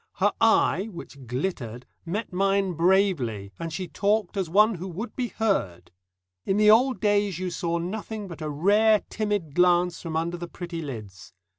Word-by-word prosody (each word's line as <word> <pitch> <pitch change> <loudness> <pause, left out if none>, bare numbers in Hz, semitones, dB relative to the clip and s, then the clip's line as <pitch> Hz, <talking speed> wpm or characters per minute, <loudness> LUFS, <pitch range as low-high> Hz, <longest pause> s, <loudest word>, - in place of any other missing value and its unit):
Her 205 +2 +2
eye 220 -2 +3
which 140 - -11
glittered 125 -3 -4 0.2
met 205 +3 -3
mine 195 0 +1
bravely, 165 - +1
and 165 0 -4
she 185 +3 -4
talked 210 0 0
as 190 -4 -2
one 210 +5 +5
who 185 0 -6
would 210 +6 -6
be 250 -2 -1
heard. 195 - -2 0.5
In 195 - 0
the 210 0 +6
old 250 +3 +4
days 205 -4 +1
you 185 0 -3
saw 170 0 -1
nothing 205 +4 -5
but 170 -3 -9
a 155 - -3
rare 205 +8 +3
timid 205 -8 -2
glance 180 0 +3
from 160 -2 -3
under 170 +2 -2
the 175 0 -6
pretty 170 -1 -6
lids. 105 - -8
180 Hz, 170 wpm, -26 LUFS, 165-205 Hz, 0.5 s, the